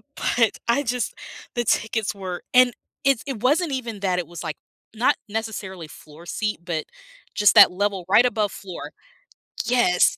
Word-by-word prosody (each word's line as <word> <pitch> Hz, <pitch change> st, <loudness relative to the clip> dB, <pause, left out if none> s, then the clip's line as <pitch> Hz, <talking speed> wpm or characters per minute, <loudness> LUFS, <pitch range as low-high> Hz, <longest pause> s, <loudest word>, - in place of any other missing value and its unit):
But, 230 Hz, -3 st, +1 dB
I 280 Hz, +5 st, +2 dB
just 245 Hz, 0 st, -2 dB, 0.4 s
the 240 Hz, -, 0 dB
tickets 220 Hz, -1 st, 0 dB
were 185 Hz, -2 st, -6 dB
and 250 Hz, -1 st, +6 dB, 0.3 s
it's 275 Hz, -4 st, +2 dB
it 245 Hz, -6 st, -4 dB
wasn't 300 Hz, +5 st, +2 dB
even 230 Hz, -6 st, -4 dB
that; 185 Hz, -2 st, +1 dB
it 175 Hz, -, -4 dB
was, 170 Hz, -1 st, -8 dB
like, 155 Hz, -3 st, -4 dB, 0.4 s
not 235 Hz, +4 st, +3 dB
necessarily 200 Hz, -6 st, -5 dB
floor 155 Hz, +2 st, -14 dB
seat, 210 Hz, +1 st, -2 dB
but 165 Hz, -3 st, -2 dB, 0.5 s
just 210 Hz, +2 st, +4 dB
that 205 Hz, -3 st, +9 dB
level 195 Hz, -1 st, -1 dB
right 230 Hz, +5 st, +6 dB
above 215 Hz, -5 st, 0 dB
floor. 185 Hz, -3 st, -8 dB, 0.7 s
Yes. 235 Hz, -7 st, +3 dB
210 Hz, 160 wpm, -23 LUFS, 180-240 Hz, 0.7 s, that